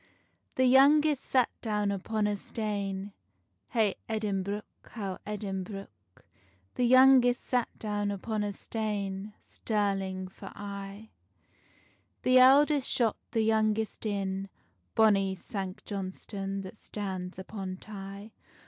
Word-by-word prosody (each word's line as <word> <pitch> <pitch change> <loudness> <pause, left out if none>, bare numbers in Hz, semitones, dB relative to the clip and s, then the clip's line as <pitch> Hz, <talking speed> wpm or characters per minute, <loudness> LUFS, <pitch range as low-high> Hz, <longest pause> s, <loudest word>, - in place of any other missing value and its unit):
The 260 - +3
youngest 285 +3 +6
sat 255 -3 +2
down 210 -3 0
upon 210 +2 -1
a 205 0 +1
stane, 200 -2 -3 0.6
Hey 215 -4 +2 0.2
Edinbruch, 205 -1 -1 0.2
how 195 -5 -6
Edinbruch. 195 -1 -4 0.8
The 250 - +1
youngest 255 0 +6
sat 245 -2 0
down 205 -1 -2
upon 210 +2 -2
a 205 - -1
stane, 205 -1 -4
Stirling 195 -3 -2
for 185 - -11
aye: 200 +1 -7 1.1
The 255 0 +6
eldest 280 +2 +6
shot 230 -4 +1
the 225 -2 +1
youngest 220 0 +1
in, 195 -1 -2 0.5
Bonny 195 -3 +4
Sanct 190 0 -6
Johnstonne 195 0 -4
that 190 +3 -9
stands 190 -4 -5
upon 190 -1 -6
Tay. 200 +1 -9
205 Hz, 110 wpm, -30 LUFS, 195-225 Hz, 1.1 s, youngest